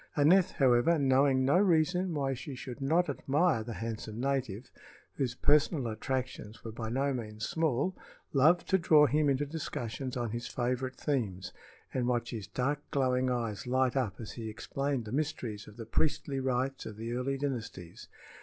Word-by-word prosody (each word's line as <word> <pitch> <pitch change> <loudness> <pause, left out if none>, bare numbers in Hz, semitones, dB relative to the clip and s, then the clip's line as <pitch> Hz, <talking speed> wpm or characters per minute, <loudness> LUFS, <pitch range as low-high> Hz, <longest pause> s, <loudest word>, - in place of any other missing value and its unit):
Aneth, 180 +6 +5
however, 130 +5 +4
knowing 135 -1 +3
no 145 +7 +4
reason 180 -1 +2
why 135 -2 0
she 135 +2 -7
should 125 +1 -8
not 165 +6 +2
admire 145 0 +1
the 115 +1 -6
handsome 110 +1 -5
native, 130 -4 -2 0.4
whose 125 -3 -2
personal 145 0 +3
attractions 115 -1 -4
were 115 - -6
by 110 0 -5
no 135 +4 0
means 110 -2 -4
small, 160 +2 0 0.4
loved 160 +6 +4
to 190 - +4
draw 155 -3 +6
him 150 +2 +2
into 140 +1 +1
discussions 130 -4 -4
on 120 -3 -2
his 120 +1 -4
favorite 130 +1 -2
themes 110 -11 -2 0.4
and 125 -2 0
watch 120 -1 0
his 110 -5 -5
dark, 140 +3 -1
glowing 130 -2 +1
eyes 115 -4 -2
light 130 0 +2
up 115 -8 -1
as 110 - -6
he 115 -2 -6
explained 135 +3 -3
the 105 - -7
mysteries 125 -7 -3
of 105 +1 -13
the 115 - -6
priestly 140 +3 0
rites 130 +1 -1
of 105 - -8
the 115 +2 -4
early 130 +3 -1
dynasties. 115 -11 -5
130 Hz, 170 wpm, -31 LUFS, 115-145 Hz, 0.4 s, draw